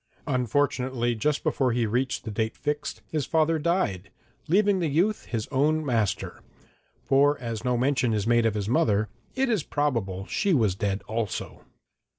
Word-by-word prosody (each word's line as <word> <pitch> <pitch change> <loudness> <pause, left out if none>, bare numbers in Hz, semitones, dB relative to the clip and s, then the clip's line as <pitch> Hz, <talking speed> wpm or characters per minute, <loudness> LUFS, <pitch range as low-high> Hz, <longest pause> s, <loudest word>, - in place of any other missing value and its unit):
Unfortunately, 130 -2 0
just 140 +6 0
before 130 -3 +1
he 120 -1 +1
reached 125 +4 -1
the 110 - -5
date 110 +1 -2
fixed, 150 0 -3
his 150 -4 -1
father 160 0 +2
died, 130 - 0 0.4
leaving 200 +3 +3
the 170 - 0
youth 180 +9 +1
his 115 -3 -3
own 150 +3 +1
master 110 -7 -1 0.6
for 145 +2 +4
as 115 -3 -5
no 125 -1 +1
mention 130 -1 +1
is 105 -2 0
made 120 0 +3
of 110 - -1
his 100 -1 -2
mother, 110 -2 +2 0.3
it 270 +1 +1
is 220 -7 +1
probable 115 -12 -1
she 195 - +1
was 110 -8 +2
dead 100 0 -2
also. 110 -2 -4
125 Hz, 165 wpm, -26 LUFS, 110-150 Hz, 0.6 s, for